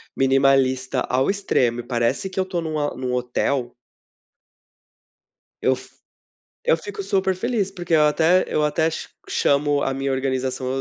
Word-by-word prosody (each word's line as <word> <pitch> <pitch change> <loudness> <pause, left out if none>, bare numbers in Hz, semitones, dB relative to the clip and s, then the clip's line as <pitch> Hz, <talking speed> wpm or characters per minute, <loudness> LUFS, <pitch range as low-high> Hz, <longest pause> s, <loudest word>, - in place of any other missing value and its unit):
minimalista 135 -1 +2
ao 130 +2 +2
extremo 125 - 0
e 120 - -4
parece 120 +9 -1
que 190 - -5
eu 185 - +1
tô 180 -3 -3
num 155 -1 -3
a 145 -1 -1
num 125 0 -3
hotel 125 0 -1 1.9
Eu - - +3
f - - -13 0.7
eu - - +4
fico 200 +5 -8
super 195 -1 0
feliz, 210 -2 -1
porque 175 -3 -2
eu 155 - +5
até 165 +4 +3
eu 150 - +1
até 160 +2 +1
cha - - -6 0.2
chamo 145 0 +2
a 135 - -1
minha 135 0 -2
organização 130 -1 -1
140 Hz, 155 wpm, -22 LUFS, 130-175 Hz, 1.9 s, eu